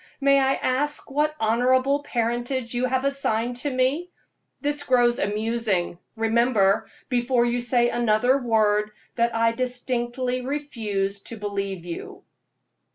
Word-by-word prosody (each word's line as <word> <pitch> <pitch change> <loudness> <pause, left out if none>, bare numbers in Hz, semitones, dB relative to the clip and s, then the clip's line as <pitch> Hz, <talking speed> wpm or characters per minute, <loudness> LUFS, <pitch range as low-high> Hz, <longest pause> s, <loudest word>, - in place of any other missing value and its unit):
May 275 0 +4
I 270 0 +2
ask 290 +3 -1
what 300 +2 +1
honorable 255 +5 +2
parentage 240 0 -2
you 245 +1 0
have 260 +1 0
assigned 245 -4 0
to 285 +4 -2
me? 270 +7 0 0.5
This 290 0 0
grows 245 -3 +3
amusing. 210 -4 -1 0.2
Remember, 225 -3 +2 0.2
before 245 -1 +1
you 240 0 0
say 240 0 +2
another 240 +3 +2
word, 215 -3 +2 0.2
that 235 -1 0
I 230 0 +3
distinctly 250 +1 -2
refuse 220 -8 -2
to 230 - -7
believe 200 -3 -4
you." 170 -1 -7
240 Hz, 125 wpm, -24 LUFS, 225-260 Hz, 0.5 s, May